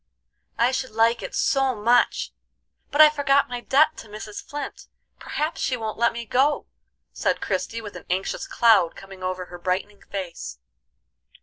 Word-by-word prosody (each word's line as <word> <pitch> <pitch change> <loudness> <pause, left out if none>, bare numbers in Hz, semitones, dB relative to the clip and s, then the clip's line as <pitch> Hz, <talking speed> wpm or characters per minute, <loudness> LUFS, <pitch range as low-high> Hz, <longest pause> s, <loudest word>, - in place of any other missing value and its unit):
"I 240 +2 +3
should 260 0 -2
like 225 +2 +2
it - - -6
so 270 -2 +2
much! 230 +3 +2 0.6
But 290 - +4
I 305 - +10
forgot 280 -2 +2
my 245 -1 -4
debt 305 +5 +3
to - - -10
Mrs. 210 0 -7
Flint; 290 -3 -7 0.3
perhaps 305 +2 -3
she 255 - 0
won't 220 -1 -5
let 235 - +4
me 235 0 -6
go," 270 +6 +2 0.5
said - - 0
Christie, 230 0 -2
with 210 -2 -9
an - - -9
anxious 185 +2 -2
cloud 215 -8 +4
coming 195 -1 -12
over 185 0 -3
her 175 0 -10
brightening 190 +3 -2
face. 170 - -6
230 Hz, 165 wpm, -24 LUFS, 195-270 Hz, 0.6 s, I